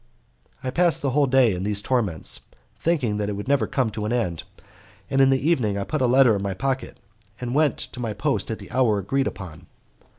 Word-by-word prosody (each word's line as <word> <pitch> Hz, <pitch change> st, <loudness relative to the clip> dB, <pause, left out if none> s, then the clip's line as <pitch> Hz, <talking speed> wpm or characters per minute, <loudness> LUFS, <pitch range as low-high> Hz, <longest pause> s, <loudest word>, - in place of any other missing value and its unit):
I 130 Hz, -, -2 dB
passed 175 Hz, +1 st, +2 dB
the 135 Hz, -, +1 dB
whole 140 Hz, +1 st, +3 dB
day 130 Hz, -4 st, +4 dB
in 90 Hz, -, -4 dB
these 105 Hz, 0 st, -1 dB
torments, 105 Hz, -8 st, -1 dB, 0.4 s
thinking 130 Hz, -11 st, 0 dB
it 105 Hz, 0 st, -2 dB
would 100 Hz, +3 st, -6 dB
never 135 Hz, -6 st, +2 dB
come 130 Hz, -5 st, 0 dB
to 105 Hz, 0 st, -4 dB
an 105 Hz, -, -2 dB
end, 90 Hz, -10 st, -1 dB, 0.7 s
and 135 Hz, -, +3 dB
in 135 Hz, -, +6 dB
the 135 Hz, +2 st, +1 dB
evening 115 Hz, -12 st, +1 dB
I 100 Hz, -, -1 dB
put 155 Hz, +6 st, -2 dB
a 130 Hz, -, +3 dB
letter 125 Hz, -2 st, +5 dB
in 100 Hz, -, -2 dB
my 100 Hz, -1 st, -2 dB
pocket, 135 Hz, +3 st, -2 dB, 0.4 s
and 125 Hz, -1 st, -4 dB
went 150 Hz, 0 st, +2 dB
to 125 Hz, -, -7 dB
my 115 Hz, -3 st, -2 dB
post -, -, -1 dB
at -, -, -2 dB
the -, -, -12 dB
hour 120 Hz, -5 st, +2 dB
agreed 135 Hz, +8 st, 0 dB
upon. 90 Hz, -6 st, -8 dB
125 Hz, 220 wpm, -24 LUFS, 105-135 Hz, 0.7 s, in